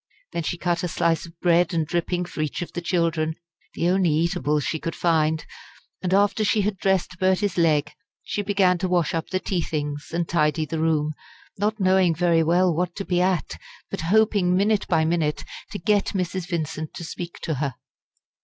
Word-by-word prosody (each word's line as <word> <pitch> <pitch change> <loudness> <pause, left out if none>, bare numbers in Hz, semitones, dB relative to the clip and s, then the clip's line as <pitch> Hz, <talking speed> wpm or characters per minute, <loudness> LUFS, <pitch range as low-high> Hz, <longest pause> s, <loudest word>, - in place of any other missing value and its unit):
Then - - -1
she 170 +2 -3
cut 175 -1 0
a 180 - -1
slice 165 0 0
of 165 0 -17
bread 175 0 +3
and 160 -2 +1
dripping 175 +2 -1
for 165 -3 -5
each 155 +3 -2
of - - -11
the 175 - -3
children 165 -3 0 0.4
the 170 - 0
only 185 -1 +3
eatables 150 -2 +1
she 160 - -2
could 165 - -4
find 160 -2 +1 0.6
and 185 - -2
after 205 +2 +3
she 210 0 +2
had 200 0 -1
dressed 190 -1 0
Bertie's 190 0 +1
leg 155 -4 +2 0.3
she 205 - -2
began 195 -3 +2
to 185 - 0
wash 175 -3 +1
up 165 -1 -2
the 185 - 0
tea 185 -2 -1
things 145 -2 -3
and 170 0 -1
tidy 155 -1 +1
the 160 +2 -4
room, 155 -1 +1 0.5
not 215 +2 0
knowing 185 -3 +3
very 170 0 +3
well 175 +2 +3
what 175 +1 -1
to 195 - -4
be 180 -1 +1
at, 185 -2 0 0.3
but - - -3
hoping 190 0 +3
minute 205 +1 +2
by 160 -2 +2
minute 160 -2 0 0.3
to - - -5
get 205 +3 +1
Mrs. 180 -1 -2
Vincent 155 -2 -3
to - - -6
speak 170 +1 -6
to 160 - -1
her. 140 -4 -1
170 Hz, 195 wpm, -24 LUFS, 160-185 Hz, 0.6 s, bread